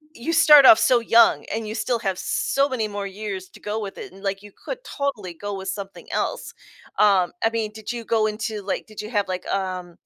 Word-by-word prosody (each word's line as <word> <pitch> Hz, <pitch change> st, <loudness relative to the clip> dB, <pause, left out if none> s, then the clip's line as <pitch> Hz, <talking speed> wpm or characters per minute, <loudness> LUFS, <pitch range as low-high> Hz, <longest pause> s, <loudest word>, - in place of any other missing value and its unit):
you 260 Hz, +8 st, -3 dB
start 300 Hz, -4 st, +8 dB
off 225 Hz, -3 st, +9 dB
so 235 Hz, +2 st, +4 dB
young, 230 Hz, 0 st, +4 dB
and 220 Hz, 0 st, -3 dB
you 215 Hz, -, -5 dB
still 235 Hz, +1 st, -1 dB
have 190 Hz, -3 st, -2 dB
so 275 Hz, +1 st, 0 dB
many 230 Hz, -5 st, -1 dB
more 205 Hz, -1 st, -5 dB
years 195 Hz, -2 st, -6 dB
to -, -, -16 dB
go 210 Hz, +2 st, -3 dB
with 200 Hz, -2 st, -6 dB
it, -, -, -9 dB
and, 195 Hz, +1 st, -15 dB
like, 195 Hz, +1 st, -3 dB
you 205 Hz, -, -13 dB
could -, -, -7 dB
totally 240 Hz, -, -4 dB
go 205 Hz, +4 st, -6 dB
with 190 Hz, 0 st, -7 dB
something 195 Hz, 0 st, -6 dB
else. -, -, -3 dB, 0.5 s
Um, 195 Hz, -4 st, +4 dB
I 225 Hz, -, +4 dB
mean, 225 Hz, -2 st, -2 dB
did 220 Hz, 0 st, -6 dB
you 235 Hz, -2 st, -6 dB
go 220 Hz, -1 st, +2 dB
into, 215 Hz, 0 st, -4 dB
like 195 Hz, 0 st, -3 dB
did 215 Hz, -, -8 dB
you 210 Hz, -, -8 dB
have, 205 Hz, -4 st, 0 dB
like, 185 Hz, -1 st, -4 dB
um 185 Hz, -3 st, -3 dB
210 Hz, 235 wpm, -23 LUFS, 195-230 Hz, 0.5 s, off